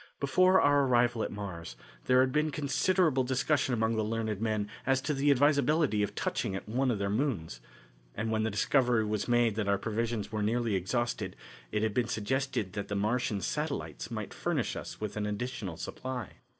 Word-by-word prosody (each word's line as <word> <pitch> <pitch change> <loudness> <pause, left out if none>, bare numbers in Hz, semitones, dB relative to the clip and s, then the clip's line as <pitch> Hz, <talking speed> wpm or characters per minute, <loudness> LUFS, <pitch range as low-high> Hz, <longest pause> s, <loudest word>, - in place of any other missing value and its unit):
Before 185 +7 +4
our 145 -1 +4
arrival 120 -2 +3
at - - -2
Mars, 85 -10 -6 0.3
there 130 0 +5
had 130 0 +2
been 150 +2 +1
considerable 150 0 +2
discussion 130 +2 +1
among 110 -1 +1
the 110 - +1
learned 110 -1 -2
men 110 -2 0 0.2
as 135 0 +2
to 150 +3 -1
the 140 +1 +1
advisability 145 -3 +3
of 105 - -2
touching 95 - -1
at 95 - -6
one 130 +5 +1
of 115 - +1
their 100 0 -1
moons, 105 - -1 0.6
and 110 +1 -2
when 110 -1 +1
the 110 - +1
discovery 120 +2 +2
was 105 -1 -2
made 120 -2 +3
that 105 -2 -1
our 100 0 +3
provisions 110 0 -2
were 110 -1 -2
nearly 115 +1 0
exhausted, 105 0 -1 0.4
it 105 - 0
had 110 -2 0
been 120 0 +1
suggested 115 -2 -1
that 100 -1 -4
the 100 - -3
Martian 105 0 0
satellites 140 - -3
might - - -5
furnish - - -1
us - - -7
with 105 -2 -4
an 105 0 -1
additional 105 -5 -4
supply. 125 +2 -5
115 Hz, 190 wpm, -30 LUFS, 105-130 Hz, 0.6 s, there